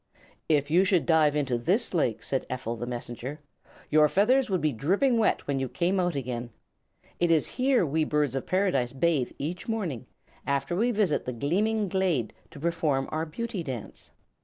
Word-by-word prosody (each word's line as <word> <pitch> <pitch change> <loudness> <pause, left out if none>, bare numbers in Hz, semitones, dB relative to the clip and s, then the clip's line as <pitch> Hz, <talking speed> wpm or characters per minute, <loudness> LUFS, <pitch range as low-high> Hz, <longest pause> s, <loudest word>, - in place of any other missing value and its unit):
"If 145 -1 +2
you 180 +4 +5
should 190 -4 +2
dive 155 -3 +4
into 135 -5 0
this 190 - 0
lake," 125 -10 0
said 135 - -2
Ephel 125 -2 -3
the 120 +1 -5
Messenger, 120 +4 -5 0.5
"your 150 0 +5
feathers 245 - +3
would 185 -2 +1
be 155 -2 +1
dripping 200 - +1
wet 220 - +1
when 140 -1 -1
you 130 -1 -2
came 180 +6 0
out 175 -3 0
again. 125 -3 -4 0.7
It 175 - +2
is 160 -3 +3
here 255 -5 +2
we 155 +2 +1
Birds 150 -3 0
of 135 - -3
Paradise 180 -11 +1
bathe 140 -2 +1
each 170 +6 -5
morning, 190 - -3 0.4
after 140 +5 0
which - - -1 0.2
we - - -8
visit 195 -8 +1
the 125 - -3
Gleaming 205 - 0
Glade 175 - 0 0.2
to - - -12
perform 155 -4 0
our 160 +1 -2
Beauty 220 +4 -4
Dance." 130 -8 -7
155 Hz, 185 wpm, -27 LUFS, 135-185 Hz, 0.7 s, you